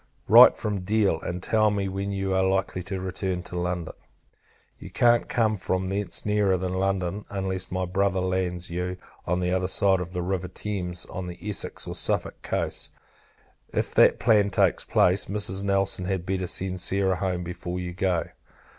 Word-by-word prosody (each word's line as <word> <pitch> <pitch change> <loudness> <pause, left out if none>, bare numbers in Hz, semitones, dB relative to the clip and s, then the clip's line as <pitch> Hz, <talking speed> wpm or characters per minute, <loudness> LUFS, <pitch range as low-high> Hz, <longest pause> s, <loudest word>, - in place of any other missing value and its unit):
Write - - +9
from 105 -2 -2
Deal, 100 -3 +1
and 90 +1 -5
tell 110 -1 +3
me 100 -1 -1
when 95 +1 -3
you 95 -1 -2
are 95 - +2
likely 95 -1 0
to 95 +1 -5
return 95 -1 -3
to 90 - -8
London. 90 -1 -3 0.9
You - - -9
can't 120 -1 +3
come 110 -3 +1
from 95 -1 -2
thence 100 +1 -2
nearer 105 -2 +2
than 90 0 -3
London, 95 0 -1
unless 95 -2 -3
my 95 0 -1
Brother 95 +1 0
lands 90 -1 -1
you 90 +1 -3 0.3
on 90 +1 0
the 90 0 0
other 90 0 0
side 95 0 +3
of 90 -1 -5
the 90 -1 -3
river 90 0 -2
Thames, 90 -4 -4
on 90 -1 -6
the 90 0 -7
Essex 105 - -2
or - - -5
Suffolk - - -1
coasts. - - -2 0.8
If - - -2
that - - +5
plan 105 -3 +3
takes 100 - +2
place, 90 +2 +2
Mrs. 100 -1 0
Nelson 100 -1 +1
had 95 -2 -2
better 95 -1 -2
send 95 +1 -1
Sarah 95 0 +2
home 90 -2 -2
before 90 +1 -5
you 90 -1 -5
go. 90 -2 0
95 Hz, 180 wpm, -26 LUFS, 90-100 Hz, 0.9 s, Write